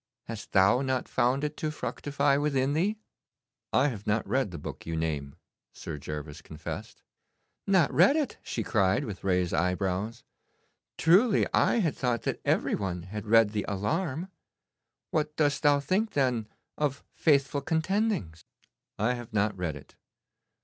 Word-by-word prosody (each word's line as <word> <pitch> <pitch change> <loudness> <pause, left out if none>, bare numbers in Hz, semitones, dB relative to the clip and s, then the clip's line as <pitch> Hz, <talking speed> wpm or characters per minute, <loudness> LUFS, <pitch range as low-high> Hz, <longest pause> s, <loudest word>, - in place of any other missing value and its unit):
Hast 115 -2 -8
thou 100 +6 +5
not 130 -2 -1
found 130 +4 +1
it 150 0 -2
to 155 - -2
fructify 145 -2 0
within 140 -1 +1
thee?' 195 +8 +1 0.7
'I 140 +3 +3
have 105 -6 -7
not 105 +1 +1
read 130 -5 +1
the 85 - -7
book 75 - -7
you 80 - -2
name,' 75 -3 -2 0.4
Sir 75 - -7
Gervas 75 +1 -6
confessed. 80 0 -8 0.6
'Not 185 -6 +3
read 190 - +6
it?' 305 -3 -1
she - - -3
cried, 95 -3 +2
with 100 -3 -7
raised 90 -2 +1
eyebrows. 95 +6 -1 0.7
'Truly 195 +7 +4
I - - +4
had 165 -6 0
thought 120 -4 -1
that - - -2
every - - +1
one 90 -3 -2
had 105 +3 -7
read 115 -1 +5
the 105 -2 -1
"Alarm." 155 - -2 0.8
What 150 -1 -1
dost 145 -2 +1
thou 145 -1 +4
think, 195 +10 0
then, 125 -6 +1 0.3
of 140 -2 -1
"Faithful 140 -2 +2
Contendings"?' 160 - -1 0.5
'I 115 +4 +1
have 120 -2 -8
not 105 0 +1
read 85 -5 -3
it. 70 - -13
125 Hz, 150 wpm, -28 LUFS, 95-150 Hz, 0.8 s, read